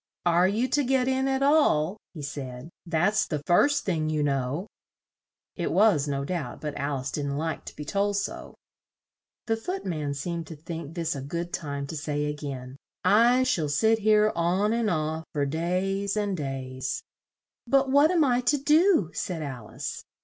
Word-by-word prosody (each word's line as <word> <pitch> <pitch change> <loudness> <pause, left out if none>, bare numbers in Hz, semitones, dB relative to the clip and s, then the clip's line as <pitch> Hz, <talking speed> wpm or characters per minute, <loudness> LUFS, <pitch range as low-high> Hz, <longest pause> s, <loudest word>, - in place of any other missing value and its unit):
"Are 175 +1 +4
you 220 +6 +1
to 290 - +2
get 260 0 +2
in 265 0 +1
at 270 0 +1
all?" 210 - +3 0.2
he 150 - -7
said. 135 0 -6 0.2
"That's 175 +6 +2
the 150 -3 -3
first 285 +11 +3
thing, 160 -5 0
you 155 -1 0
know." 140 +4 -1 0.9
It - - -2
was, 190 -8 +4
no 140 -1 -2
doubt; 160 -6 -4
but 150 -2 -5
Al 140 0 -2
ice 130 - -4
didn't 140 -1 -2
like 160 +1 -3
to - - -9
be 150 - -7
told 200 +4 0
so. 200 - -4 0.9
The 225 - +1
Foot 360 +13 -5
man 150 -6 -2
seemed 165 +2 -4
to 160 - -8
think 165 0 -7
this 165 -3 -1
a 135 - -5
good 170 +5 -4
time 140 -2 -3
to 150 - -6
say 150 -1 -2
a 150 - -1
gain, 135 -3 -7 0.3
"I 235 +6 +5
shall 160 - 0
sit 220 +10 +3
here 215 0 +4
on 185 +6 +1
and 230 -2 +1
off, 160 -1 -1
for 145 -1 +1
days 185 +6 -1
and 205 -2 0
days." 130 -3 -4 0.6
"But 270 +1 +3
what 285 +3 +6
am 340 -3 +3
I 250 -3 +2
to 270 +4 +2
do?" 300 - +4
said 165 -2 -3
Al 125 -7 -6
ice. - - -6
170 Hz, 185 wpm, -27 LUFS, 145-220 Hz, 0.9 s, what